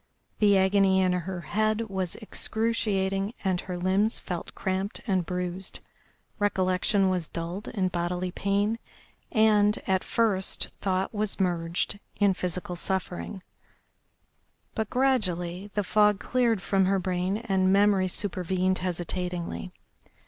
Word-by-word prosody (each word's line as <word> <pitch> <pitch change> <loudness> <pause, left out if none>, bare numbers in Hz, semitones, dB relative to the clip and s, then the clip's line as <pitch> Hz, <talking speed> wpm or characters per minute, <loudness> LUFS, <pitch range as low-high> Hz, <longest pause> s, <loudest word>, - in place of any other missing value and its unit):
The 205 -2 +5
agony 190 0 +4
in 185 -1 +3
her 180 0 -3
head 215 +6 0
was 190 -5 -3
excruciating, 210 -2 -1
and 185 -2 +1
her 180 -1 -5
limbs 190 +5 +2
felt 175 -3 -6
cramped 190 +2 -2
and 190 -5 +1
bruised. 180 +1 -4 0.6
Recollection 190 0 +2
was 180 -4 -1
dulled 170 +5 -5
in 185 -3 0
bodily 180 +1 -2
pain, 200 +4 0 0.5
and, 210 -2 +4
at 190 -1 +1
first, 210 -5 +1
thought 190 +1 0
was 210 -1 -1
merged 175 +1 0 0.2
in 200 -2 +3
physical 180 0 -4
suffering. 190 +1 -3 1.3
But 220 -2 -2
gradually 195 -8 0
the 205 - +1
fog 210 +1 +3
cleared 235 -6 +1
from 195 -1 +2
her 195 +1 +2
brain 185 +1 -1
and 190 -4 +1
memory 200 -1 +4
supervened 185 -1 0
hesitatingly. 180 - -3
190 Hz, 120 wpm, -27 LUFS, 180-205 Hz, 1.3 s, The